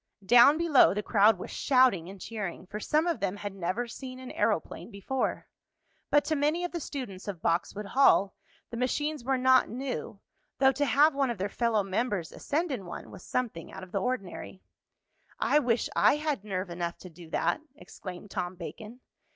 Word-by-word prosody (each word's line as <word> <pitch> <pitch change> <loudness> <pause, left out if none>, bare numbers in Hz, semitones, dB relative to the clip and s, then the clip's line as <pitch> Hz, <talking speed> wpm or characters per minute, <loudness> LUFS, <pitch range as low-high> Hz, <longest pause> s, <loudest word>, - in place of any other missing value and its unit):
Down 245 +7 +7
below 320 - +5
the 210 - -2
crowd 210 0 +4
was - - -8
shouting 255 - +3
and 195 0 -10
cheering, 195 -4 -5
for 205 +3 -6
some 305 - +1
of 340 -2 0
them 195 -1 -1
had 205 -1 -6
never 195 +6 -2
seen 255 +2 -8
an 255 -1 -8
aeroplane - - -1
before. 235 +5 -3 0.6
But 290 0 +4
to 315 - 0
many 300 +4 +1
of 355 - -2
the 345 - -3
students 250 - -6
of 190 -5 -6
Boxwood 180 +5 0
Hall 200 -4 +4 0.4
the 235 - -5
machines 295 +3 -1
were 265 +1 +1
not 260 0 +4
new, 250 -4 -5 0.4
though 265 0 +5
to 290 +2 0
have 285 +5 +4
one 275 -2 +1
of 235 - -3
their 195 +2 -2
fellow 225 -2 +1
members 195 -3 -2
ascend 320 +3 -2
in 205 -9 -4
one - - -8
was - - -11
something 225 -10 -3
out 190 - -9
of 185 - -11
the 195 - -1
ordinary. 195 -5 -4 0.8
"I 295 - +3
wish 240 -4 +1
I - - +5
had 300 -8 -2
nerve 190 -3 -4
enough 170 0 -3
to 185 - -11
do 165 0 -13
that!" 300 - 0
exclaimed 190 -7 -10
Tom 180 +1 -3
Bacon. 215 +7 -9
230 Hz, 190 wpm, -29 LUFS, 190-270 Hz, 0.8 s, Down